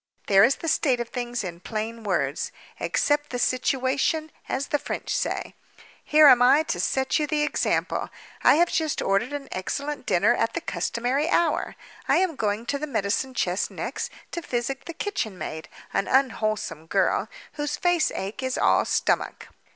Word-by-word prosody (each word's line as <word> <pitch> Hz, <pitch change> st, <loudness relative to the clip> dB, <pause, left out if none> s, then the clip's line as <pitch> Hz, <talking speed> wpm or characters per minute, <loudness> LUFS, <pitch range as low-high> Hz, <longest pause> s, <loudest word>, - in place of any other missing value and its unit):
There 195 Hz, -1 st, +6 dB
is 245 Hz, +4 st, +5 dB
the 330 Hz, -, -7 dB
state 275 Hz, -5 st, +2 dB
of 240 Hz, -1 st, -4 dB
things 245 Hz, -2 st, -3 dB
in 170 Hz, -2 st, -6 dB
plain 220 Hz, +4 st, -5 dB
words. 160 Hz, -8 st, -1 dB, 0.3 s
Accept 290 Hz, 0 st, +1 dB
the 250 Hz, -, -3 dB
situation—as 265 Hz, +3 st, -1 dB
the 295 Hz, -3 st, +1 dB
French -, -, -3 dB
say. -, -, -2 dB, 0.5 s
Here 305 Hz, 0 st, +6 dB
am 250 Hz, -4 st, +8 dB
I 270 Hz, +5 st, +6 dB
to -, -, -3 dB
set 265 Hz, +3 st, +1 dB
you 300 Hz, -, 0 dB
the 300 Hz, 0 st, +1 dB
example. 300 Hz, -, 0 dB, 0.3 s
I -, -, +6 dB
have 345 Hz, +2 st, +3 dB
just 315 Hz, -2 st, 0 dB
ordered 195 Hz, +6 st, +1 dB
an 290 Hz, -1 st, -5 dB
excellent 280 Hz, +10 st, -4 dB
dinner -, -, +4 dB
at -, -, -1 dB
the -, -, 0 dB
customary 260 Hz, +7 st, -1 dB
hour. 340 Hz, -3 st, +1 dB, 0.3 s
I -, -, +4 dB
am 360 Hz, -4 st, +1 dB
going 215 Hz, -1 st, -1 dB
to 280 Hz, +3 st, -2 dB
the 305 Hz, -, -3 dB
medicine 240 Hz, +2 st, -1 dB
chest 180 Hz, -2 st, 0 dB
next, -, -, -4 dB, 0.2 s
to 345 Hz, -, -4 dB
physic 260 Hz, -1 st, -3 dB
the 335 Hz, -, -6 dB
kitchen 325 Hz, -, -3 dB
maid—an 160 Hz, +4 st, -5 dB
unwholesome 215 Hz, -, 0 dB
girl, 195 Hz, +3 st, +1 dB, 0.2 s
whose 295 Hz, -1 st, -3 dB
face 350 Hz, -2 st, +2 dB
ache 200 Hz, +7 st, -4 dB
is 260 Hz, -1 st, -2 dB
all -, -, +3 dB
stomach. -, -, 0 dB
260 Hz, 165 wpm, -25 LUFS, 215-295 Hz, 0.5 s, am